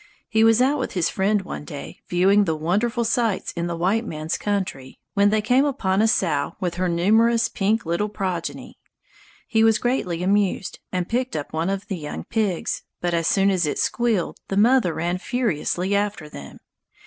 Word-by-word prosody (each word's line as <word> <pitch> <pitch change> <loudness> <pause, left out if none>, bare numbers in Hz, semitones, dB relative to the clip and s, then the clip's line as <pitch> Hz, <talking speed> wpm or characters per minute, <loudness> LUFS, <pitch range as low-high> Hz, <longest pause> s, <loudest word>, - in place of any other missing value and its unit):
He 220 +1 +3
was 225 +2 +5
out 280 +3 +2
with - - -3
his 180 -3 +1
friend 200 +1 +1
one 180 - -6
day, 150 -2 -8
viewing 195 +3 +4
the 160 -3 0
wonderful 210 +10 0
sights 230 -3 0
in 170 0 -3
the 170 - -3
"white 190 +7 +1
man's 155 -6 -3
country", 185 -11 -3 0.2
when 200 0 +4
they 215 0 +1
came 255 +4 +3
upon 210 -9 0
a 220 - +4
sow 155 -9 0
with 175 -2 -2
her 180 +1 -1
numerous 225 +7 +3
pink 210 +2 0
little 170 +6 -1
progeny. 185 -5 -4 0.7
He 225 -3 +2
was 225 -1 +5
greatly 180 -9 -1
amused 195 -1 0
and 180 -1 -2
picked 250 +1 -1
up 145 - -5
one 165 +3 -1
of 195 0 -3
the 195 -4 -3
young 150 -1 -6
pigs, 210 -6 -1 0.2
but 175 0 -1
as 165 -1 +1
soon 195 0 +3
as 180 -4 +1
it - - -2
squealed 230 -7 0
the 195 - -2
mother 230 -3 +4
ran 175 +2 -1
furiously 200 - -1
after 200 -6 -1
them. 70 - -10
195 Hz, 185 wpm, -23 LUFS, 175-225 Hz, 0.7 s, was